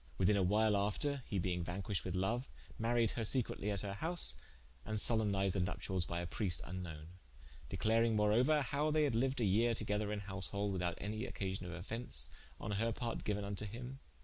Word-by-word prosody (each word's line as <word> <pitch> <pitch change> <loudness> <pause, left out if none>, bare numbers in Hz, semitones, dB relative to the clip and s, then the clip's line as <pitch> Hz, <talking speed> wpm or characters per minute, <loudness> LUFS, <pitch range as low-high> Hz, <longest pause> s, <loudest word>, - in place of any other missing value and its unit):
Within 95 +3 +4
a 100 - +3
whyle 105 +3 +3
after 105 +8 0
(he 100 - -2
being 90 -1 0
vanquished 95 +3 -2
with 90 0 -2
loue) 95 +6 +1 0.4
maried 115 -1 +2
her 115 - -2
secretly 110 -3 0
at 100 -2 -1
her 100 -1 -4
house, 165 - +3 0.5
and 110 0 -3
solempnized 105 -4 +2
the 95 - 0
nuptialles 90 0 +1
by 85 0 -2
a - - -4
Prieste 90 0 -2
vnknowen: 85 -4 -6 0.6
declaring 115 0 +2
moreouer, 125 +9 +4
how 145 +4 0
they 155 0 +3
had 140 -5 +2
liued 130 +4 +1
a 115 - +2
yere 115 +4 +3
together 105 -1 -1
in 105 -1 -2
householde, 100 +1 +2
without 90 -2 -1
any 105 +2 -3
occasion 95 -3 -3
of - - -5
offence, 90 - -1 0.3
on - - -4
her 110 +3 +1
part 115 +1 -3
geuen 105 -1 -1
vnto 100 +1 -2
him. 125 +5 -7
105 Hz, 190 wpm, -36 LUFS, 95-115 Hz, 0.6 s, Within